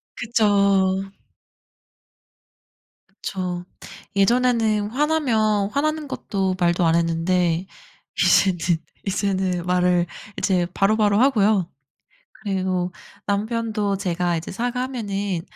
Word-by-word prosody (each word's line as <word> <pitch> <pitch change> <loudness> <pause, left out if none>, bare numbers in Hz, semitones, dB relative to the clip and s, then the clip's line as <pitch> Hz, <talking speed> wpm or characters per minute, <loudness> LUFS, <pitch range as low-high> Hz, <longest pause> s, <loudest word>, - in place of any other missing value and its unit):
그쵸. 200 -4 +2 2.0
그쵸. 180 -2 -5 0.5
예전에는 220 -1 +2
화나면 230 -8 +1
화나는 305 +4 -1
것도 195 -7 -2
말도 175 -1 +2
안 165 0 +3
했는데 170 +1 +1 0.6
이제는 190 -3 +4 0.5
이제는 190 -3 -1
말을 180 -1 +2 0.3
이제 180 -3 +1
바로바로 205 0 +2
하고요. 215 -8 +3 0.7
그리고 185 -3 -1 0.3
남편도 210 -1 -1
제가 175 -2 -1
이제 160 - -6
사과하면은 225 -5 -3
200 Hz, 210 characters per minute, -22 LUFS, 180-220 Hz, 2.0 s, 이제는